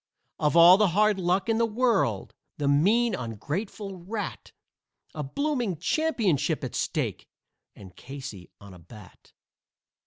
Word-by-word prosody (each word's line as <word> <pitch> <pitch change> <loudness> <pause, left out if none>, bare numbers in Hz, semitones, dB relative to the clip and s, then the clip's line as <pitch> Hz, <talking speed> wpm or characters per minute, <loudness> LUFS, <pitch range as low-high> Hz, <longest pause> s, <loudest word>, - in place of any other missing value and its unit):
Of 150 +2 +1
all 175 +2 +9
the 210 0 +3
hard 215 -2 +3
luck 185 +3 0
in 225 0 +1
the 230 - +3
world! 220 - 0 0.2
The 145 - -1
mean, 210 +12 +3
ungrateful 175 - -5
rat! 205 +4 -6 0.6
A 155 - -5
blooming 240 - -2
championship 180 - 0
at 130 - -5
stake - - -3 0.5
and 95 -3 -14
Casey 130 -8 -9
on 100 -2 -13
a 90 - -14
bat." 95 +3 -16
175 Hz, 130 wpm, -26 LUFS, 135-215 Hz, 0.6 s, all